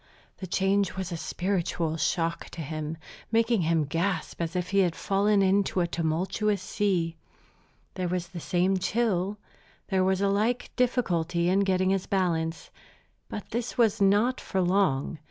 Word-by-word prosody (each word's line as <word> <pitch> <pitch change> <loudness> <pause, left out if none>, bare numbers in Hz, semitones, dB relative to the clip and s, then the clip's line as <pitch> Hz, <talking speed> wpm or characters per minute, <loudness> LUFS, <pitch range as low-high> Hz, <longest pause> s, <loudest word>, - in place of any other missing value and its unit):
The 185 - -6
change 195 +1 +1
was 190 -1 -4
a - - -2
spiritual 170 -2 -1
shock 165 +1 -1
to 170 - -5
him, 155 +1 -4 0.3
making 230 -2 +3
him 165 -1 +2
gasp 170 +4 -2
as 165 0 -3
if 180 +1 -2
he 200 - +3
had 180 -4 +2
fallen 200 +1 +2
into 195 0 +2
a 175 - +3
tumultuous 175 +5 0
sea. 175 -4 -1 0.8
There 185 -2 -2
was 175 0 -2
the 180 -2 -7
same 185 +3 +1
chill, 205 -1 0 0.5
there 190 -1 +2
was 190 0 +2
a 200 - +2
like 215 +5 0
difficulty 175 -9 +1
in 190 +2 +3
getting 190 -1 +2
his 195 -1 -1
balance. 165 -4 -1 0.6
But 210 - -7
this 240 +1 -3
was 225 -4 +3
not 210 +6 +3
for 190 - -2
long. 180 -6 +1
185 Hz, 155 wpm, -27 LUFS, 170-200 Hz, 0.8 s, making